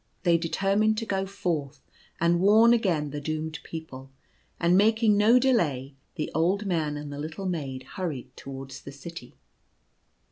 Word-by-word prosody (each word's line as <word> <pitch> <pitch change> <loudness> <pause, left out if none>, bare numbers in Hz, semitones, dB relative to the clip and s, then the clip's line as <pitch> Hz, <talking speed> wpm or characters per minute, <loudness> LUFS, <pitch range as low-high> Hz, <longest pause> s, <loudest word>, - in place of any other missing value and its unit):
They 175 -2 +4
determined 195 +6 +1
to 225 - -2
go 195 -2 -1
forth 155 -8 -3 0.4
and 170 +1 +3
warn 220 +5 +6
again 170 -11 +1
the 145 0 -5
doomed 155 +1 -3
people; 135 -5 -8 0.5
and 170 +1 +3
making 220 +2 +4
no 215 +4 +5
delay, 155 - +1 0.2
the 155 - -3
old 185 +6 +1
man 160 -6 -1
and 145 -1 -7
the 145 - -6
little 155 +6 -5
maid 140 -8 -3
hurried 135 -6 -6
towards 135 -1 -8
the 140 - -9
city. 140 -2 -10
165 Hz, 150 wpm, -27 LUFS, 145-200 Hz, 0.5 s, warn